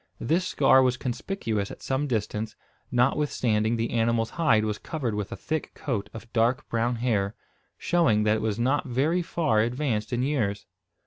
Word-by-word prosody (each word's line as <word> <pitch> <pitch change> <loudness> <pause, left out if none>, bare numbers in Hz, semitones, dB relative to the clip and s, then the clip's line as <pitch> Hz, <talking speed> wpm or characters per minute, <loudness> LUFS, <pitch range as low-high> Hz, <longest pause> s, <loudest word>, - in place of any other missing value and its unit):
This 175 +9 +1
scar 130 - +5
was 125 -1 +2
conspicuous 115 - -3
at - - -10
some 135 +2 -1
distance, 110 -2 -2 0.4
notwithstanding 120 -4 +1
the 115 0 -1
animal's 115 -1 +1
hide 115 -10 +3
was 105 -1 -2
covered 135 -9 -3
with 105 -1 -3
a - - -3
thick 160 0 -4
coat 120 -9 -3
of 115 +1 -11
dark 120 +4 +1
brown 115 +1 0
hair, 110 -4 0 0.4
showing 155 -12 +2
that 105 +1 +3
it - - -4
was 110 -2 -1
not 135 +5 +1
very 145 +8 +1
far 160 -9 +1
advanced 115 -2 -1
in 120 0 0
years. 110 -8 -1
120 Hz, 170 wpm, -26 LUFS, 110-135 Hz, 0.4 s, scar